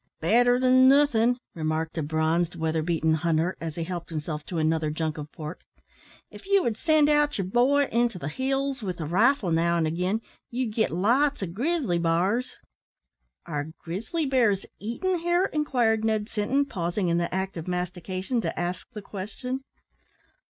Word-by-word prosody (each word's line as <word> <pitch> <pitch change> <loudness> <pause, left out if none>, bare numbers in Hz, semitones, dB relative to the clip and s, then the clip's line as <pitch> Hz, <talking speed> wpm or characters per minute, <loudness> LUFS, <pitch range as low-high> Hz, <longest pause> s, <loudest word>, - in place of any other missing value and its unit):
"Better 245 +8 +4
than 255 0 +6
nothin'," 250 -4 +4 0.2
remarked 160 0 -2
a 165 - -1
bronzed, 160 +3 0
weatherbeaten 160 0 0
hunter, 165 +2 +1
as 160 -2 -4
he 170 - -3
helped 175 0 -5
himself 155 -1 -4
to 175 - -4
another 160 0 +1
junk 155 0 -2
of 150 0 -8
pork. 155 +2 -7 0.7
"If - - -13
ye 400 0 +5
would 235 - 0
send 310 +3 +3
out 295 0 +3
yer 195 - 0
boy 255 +8 +3
into 235 -3 +1
the 145 - -5
hills 270 - -1
with 185 -4 -4
a 160 - -3
rifle 205 - +2
now 170 +1 +2
an' 165 - +1
again, 180 +7 -1 0.3
ye'd 240 -2 -2
git 220 0 +1
lots 240 - +2
o' - - 0
grizzly 230 - -1
bars." 180 +9 0 0.9
"Are 145 -3 -3
grizzly 220 - -3
bears 235 -8 +2
eaten 345 - -1
here?" 345 +2 +2
inquired 245 -8 +1
Ned 220 -1 0
Sinton, 245 +7 +1
pausing 180 -5 -2
in 170 0 +2
the 170 - -2
act 190 +1 -2
of 165 0 -6
mastication, 185 +5 -2
to - - -3
ask 175 0 -3
the 210 -3 -7
question. 215 +7 -5
195 Hz, 165 wpm, -26 LUFS, 165-255 Hz, 0.9 s, than